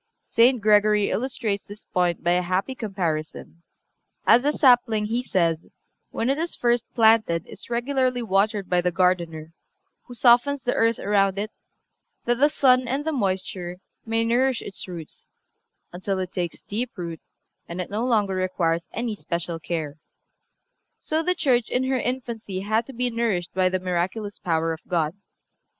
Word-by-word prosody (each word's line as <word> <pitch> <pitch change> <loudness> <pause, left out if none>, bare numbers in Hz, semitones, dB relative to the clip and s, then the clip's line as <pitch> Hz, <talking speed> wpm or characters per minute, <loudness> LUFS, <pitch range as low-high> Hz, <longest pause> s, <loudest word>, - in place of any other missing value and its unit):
St. 245 +2 +4
Gregory 210 0 +4
illustrates 225 -5 -2
this 205 +1 -12
point 175 -2 0
by 175 - +2
a 180 +1 +3
happy 185 +8 -1
comparison: 170 -7 -4 0.6
As 235 - +6
the 290 +3 +2
sapling, 245 -7 +4
he 230 +3 -1
says, 170 -9 +1 0.5
when 230 - -2
it 275 +3 +1
is 335 +1 -2
first 240 -1 0
planted 220 -8 +4
is - - -10
regularly 250 0 0
watered 200 -1 +1
by 180 -1 +2
the 180 0 0
gardener, 170 -3 0 0.5
who 245 - -9
softens 245 +3 +4
the 245 - 0
earth 230 0 +2
around 195 -1 +1
it, 210 +2 -3 0.7
that 240 0 +1
the 290 +2 +5
sun 255 -4 +3
and 275 +4 -2
the 320 - 0
moisture 190 - -2 0.3
may 225 0 0
nourish 250 +2 +1
its 195 - -7
roots 170 -4 -10 0.6
until 190 +2 -2
it 185 -1 -3
takes 175 -3 -4
deep 230 +3 -4
root 170 -3 -5 0.5
and 170 +2 -6
it 180 - -4
no 215 +3 -1
longer 215 -6 +1
requires 175 -3 -1
any 230 -2 -2
special 170 -3 -4
care, 160 -3 -4 1.0
so 315 +1 -1
the 360 +2 0
Church 255 -8 +2
in 250 - 0
her 260 0 0
infancy 230 -6 -4
had 220 +3 0
to 270 - -9
be 245 0 -1
nourished 220 -7 -1
by 185 0 +2
the 185 0 -1
miraculous 185 +4 -2
power 165 -2 0
of 160 - -9
God. 160 -3 0
210 Hz, 165 wpm, -24 LUFS, 180-245 Hz, 1.0 s, As